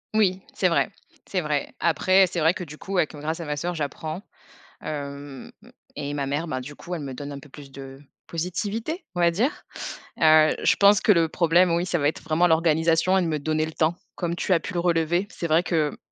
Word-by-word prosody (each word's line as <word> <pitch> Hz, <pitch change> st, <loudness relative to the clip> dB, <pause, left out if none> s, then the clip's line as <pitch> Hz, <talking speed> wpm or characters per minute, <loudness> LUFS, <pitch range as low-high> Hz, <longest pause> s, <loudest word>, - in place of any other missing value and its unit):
Oui, 190 Hz, -3 st, +2 dB
c'est -, -, +2 dB
vrai, -, -, +2 dB, 0.4 s
c'est 185 Hz, -, -1 dB
vrai. 150 Hz, -3 st, -2 dB
Après, 185 Hz, +4 st, +4 dB
c'est 180 Hz, -1 st, -4 dB
vrai 160 Hz, +3 st, +3 dB
que -, -, -5 dB
du 150 Hz, -2 st, -11 dB
coup, 195 Hz, 0 st, -4 dB
avec 165 Hz, -3 st, +1 dB
heu, 150 Hz, -, -9 dB
grâce 160 Hz, +3 st, -3 dB
à -, -, -5 dB
ma 150 Hz, -1 st, -2 dB
sœur, 175 Hz, +4 st, -3 dB
j'apprends, 155 Hz, +4 st, -4 dB, 0.6 s
hem, 140 Hz, -2 st, -6 dB, 0.4 s
et 145 Hz, 0 st, -4 dB
ma 140 Hz, -1 st, -1 dB
mère, 145 Hz, +5 st, -2 dB
ben 130 Hz, -3 st, -2 dB
du 145 Hz, +3 st, -9 dB
coup, 175 Hz, +5 st, -7 dB
elle 165 Hz, -, -5 dB
me 135 Hz, -2 st, -5 dB
donne 140 Hz, +2 st, -7 dB
un 140 Hz, -, -6 dB
peu 145 Hz, -, -16 dB
plus 140 Hz, 0 st, -12 dB
de 135 Hz, 0 st, -10 dB, 0.3 s
positivité, 210 Hz, -, -3 dB
on 175 Hz, -, -2 dB
va 170 Hz, 0 st, +5 dB
dire. 220 Hz, -, +1 dB, 0.7 s
Heu, 155 Hz, -1 st, +6 dB
je -, -, +4 dB
pense 200 Hz, 0 st, +5 dB
que -, -, +4 dB
le 170 Hz, -4 st, +4 dB
problème, 170 Hz, +2 st, +3 dB
oui, 170 Hz, +2 st, 0 dB
ça 175 Hz, -, 0 dB
va 145 Hz, -3 st, +2 dB
être 155 Hz, -, -2 dB
vraiment 160 Hz, +2 st, +2 dB
l'organisation 165 Hz, +2 st, +3 dB
et 190 Hz, -, +2 dB
de -, -, -1 dB
me 155 Hz, -2 st, -1 dB
donner 155 Hz, +2 st, 0 dB
le 160 Hz, -, -6 dB
temps 160 Hz, +2 st, +1 dB, 0.2 s
comme 170 Hz, -1 st, -2 dB
tu 185 Hz, -, 0 dB
as 170 Hz, -, +4 dB
pu 205 Hz, -, -7 dB
le -, -, +1 dB
relever. 170 Hz, +2 st, +1 dB
C'est 170 Hz, -, -4 dB
vrai 160 Hz, +2 st, +3 dB
que, 155 Hz, -5 st, 0 dB
165 Hz, 235 wpm, -25 LUFS, 150-180 Hz, 0.7 s, Heu